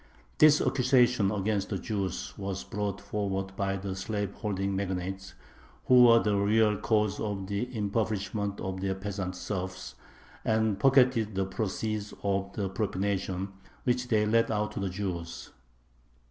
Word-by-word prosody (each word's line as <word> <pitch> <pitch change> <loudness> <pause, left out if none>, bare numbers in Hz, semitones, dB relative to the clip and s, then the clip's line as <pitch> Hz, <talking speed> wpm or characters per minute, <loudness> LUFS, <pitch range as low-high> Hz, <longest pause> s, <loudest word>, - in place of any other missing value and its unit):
This 155 0 +7
accusation 125 -5 +3
against 100 0 -1
the 100 - -1
Jews 100 -2 -3
was 95 -1 -4
brought 100 -1 -3
forward 95 -2 -3
by 95 0 -1
the 95 0 -4
slaveholding 100 -1 -2
magnates, 95 0 -4 0.5
who 125 -1 +7
were 115 -1 +8
the 105 -3 +2
real 105 +1 +3
cause 105 -1 +1
of 100 -3 -3
the 100 +5 -2
impoverishment 105 -1 -1
of 95 0 -4
their 95 0 -1
peasant 95 -1 -4
serfs, 95 0 -5 0.5
and 110 -2 +1
pocketed 125 -4 +4
the 95 0 +1
proceeds 105 +1 -3
of 100 0 0
the 100 -2 -2
"propination" 95 -1 -2 0.3
which 125 0 0
they 110 -3 +2
let 115 +2 +3
out 105 -1 0
to 105 - -5
the 100 -1 -1
Jews. 90 -3 -5
100 Hz, 140 wpm, -29 LUFS, 95-110 Hz, 0.5 s, were